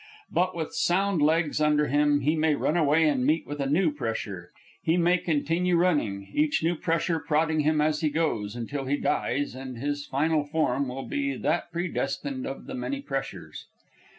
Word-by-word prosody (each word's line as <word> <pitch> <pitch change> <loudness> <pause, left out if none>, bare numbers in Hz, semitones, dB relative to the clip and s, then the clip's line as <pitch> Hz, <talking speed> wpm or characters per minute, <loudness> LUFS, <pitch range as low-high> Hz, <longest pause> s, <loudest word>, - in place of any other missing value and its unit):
But, 185 +1 +1
with 160 -2 -4
sound 190 -1 +1
legs 155 0 +2
under 150 0 +3
him, 145 +1 +2
he 150 +4 +2
may 155 -1 +2
run 150 - 0
away, 160 -1 +4
and 135 -4 +1
meet 155 +5 +2
with 145 0 -6
a 140 - 0
new 160 +2 +3
pressure. 110 -9 -4 0.3
He 165 +1 +1
may 175 +1 +3
continue 170 +3 +1
running, 110 - 0
each 150 +1 +1
new 165 +2 +2
pressure 165 +1 0
prodding 160 0 +1
him 150 +1 +2
as 150 0 +1
he 155 - +2
goes, 130 -9 -1
until 135 +4 -4
he 140 +2 0
dies 145 -1 -1
and 130 -1 -7
his 145 +3 -3
final 150 +2 +1
form 145 -3 0
will 130 +2 -5
be 280 -1 -2
that 175 - -1
predestined 140 -6 -3
of 135 - -6
the - - -7
many 275 +2 -3
pressures. 135 - -6
150 Hz, 180 wpm, -27 LUFS, 140-165 Hz, 0.3 s, away